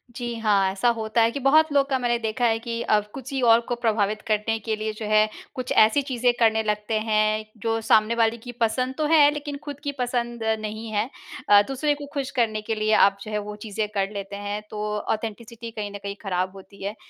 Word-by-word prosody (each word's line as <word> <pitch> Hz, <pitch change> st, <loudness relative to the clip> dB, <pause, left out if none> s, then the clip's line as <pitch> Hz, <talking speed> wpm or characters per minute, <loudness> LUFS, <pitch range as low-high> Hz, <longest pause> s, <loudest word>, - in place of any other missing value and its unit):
जी, 240 Hz, -1 st, -4 dB
हाँ। 200 Hz, -3 st, +2 dB
ऐसा 195 Hz, +5 st, +1 dB
होता 220 Hz, +1 st, 0 dB
है 225 Hz, +1 st, +4 dB
कि 280 Hz, -, -4 dB
बहुत 305 Hz, +4 st, +4 dB
लोग 280 Hz, -1 st, +3 dB
का 265 Hz, -, +2 dB
मैंने 240 Hz, -1 st, +1 dB
देखा 225 Hz, +2 st, -1 dB
है 225 Hz, -1 st, +2 dB
कि 230 Hz, 0 st, -4 dB
अब 210 Hz, -2 st, +2 dB
कुछ 265 Hz, -1 st, -8 dB
ही 270 Hz, -, -1 dB
और 230 Hz, -1 st, +6 dB
को 245 Hz, -, 0 dB
प्रभावित 215 Hz, -3 st, 0 dB
करने 215 Hz, +1 st, +1 dB
के 220 Hz, +1 st, -2 dB
लिए 215 Hz, 0 st, -3 dB
जो 215 Hz, 0 st, -7 dB
है 215 Hz, 0 st, +4 dB, 0.3 s
कुछ 255 Hz, -2 st, -4 dB
ऐसी 220 Hz, +6 st, +5 dB
चीज़ें 250 Hz, -3 st, +1 dB
करने 220 Hz, -1 st, +3 dB
लगते 210 Hz, 0 st, -2 dB
हैं 215 Hz, 0 st, +1 dB, 0.2 s
जो 225 Hz, 0 st, 0 dB
सामने 220 Hz, +1 st, +3 dB
वाली 230 Hz, 0 st, +2 dB
की 245 Hz, +2 st, -9 dB
पसंद 255 Hz, +4 st, 0 dB
तो 310 Hz, -, 0 dB
है 300 Hz, -3 st, +7 dB
लेकिन 290 Hz, -1 st, -5 dB
खुद 285 Hz, -1 st, -7 dB
की 285 Hz, -, -1 dB
पसंद 240 Hz, -1 st, -2 dB, 0.2 s
नहीं 215 Hz, +1 st, -5 dB
है। 215 Hz, +3 st, 0 dB, 0.4 s
अ, 205 Hz, 0 st, +8 dB
दूसरे 280 Hz, +2 st, 0 dB
को 290 Hz, 0 st, -8 dB
खुश 280 Hz, -1 st, -3 dB
करने 220 Hz, -2 st, +1 dB
के 220 Hz, +1 st, -3 dB
लिए 215 Hz, 0 st, +1 dB
आप 200 Hz, 0 st, -3 dB
जो 215 Hz, -, -7 dB
है 210 Hz, -, -1 dB
वो 210 Hz, -, -6 dB
चीज़ें 215 Hz, 0 st, -2 dB
कर 195 Hz, -1 st, 0 dB
लेते 200 Hz, 0 st, -6 dB
हैं 205 Hz, +1 st, -4 dB
तो 210 Hz, 0 st, -5 dB, 0.2 s
ऑथेंटिसिटी 230 Hz, +2 st, -5 dB
कहीं 210 Hz, -2 st, -5 dB
न 205 Hz, -, -6 dB
कहीं 200 Hz, 0 st, -4 dB
ख़राब 185 Hz, -2 st, -1 dB
होती 195 Hz, +1 st, -13 dB
है। 200 Hz, +2 st, -3 dB
225 Hz, 230 wpm, -24 LUFS, 215-245 Hz, 0.4 s, अ